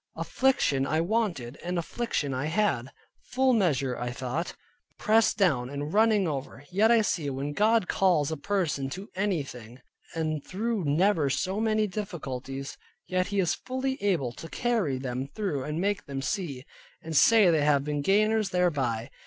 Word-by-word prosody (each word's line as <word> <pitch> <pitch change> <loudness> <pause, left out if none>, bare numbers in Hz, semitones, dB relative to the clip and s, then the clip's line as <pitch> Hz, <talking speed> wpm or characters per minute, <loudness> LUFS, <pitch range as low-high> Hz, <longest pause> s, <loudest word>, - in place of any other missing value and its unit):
Affliction 145 - +1
I 155 - +1
wanted, 170 - -1
and 180 +1 -2
affliction 170 - -2
I 130 +3 -2
had, 155 - 0 0.4
full 260 0 +3
measure 140 - +1
(I 120 - -2
thought), 130 +7 -4 0.4
pressed 220 +1 +3
down 140 - +2
and 145 +2 -5
running 215 -3 +4
over. 140 -1 -5
Yet 210 +5 +4
I 230 -1 +5
see, 160 -8 -1
when 140 +2 -3
God 215 +1 +3
calls 170 -6 +2
a - - -1
person 150 -5 -1
to 200 +4 -9
anything, 135 - -3 0.4
and 155 -2 -2
through 215 -1 -2
never 155 0 +2
so 190 +8 -1
many 215 -1 +2
difficulties, 135 - -5 0.3
yet 185 0 0
He 200 0 -1
is 175 -4 +2
fully 260 0 -3
able 170 -12 +1
to 165 +7 -10
carry 220 - 0
them 130 0 -4
through 150 -4 -3
and 150 +2 -3
make 200 0 -1
them 135 -1 -4
see, 145 -9 -3 0.4
and 160 0 -5
say 210 +2 +6
they 160 -2 +2
have 145 -1 +3
been 145 0 -2
gainers 215 +4 +2
thereby. 140 -11 0
165 Hz, 160 wpm, -28 LUFS, 140-205 Hz, 0.4 s, say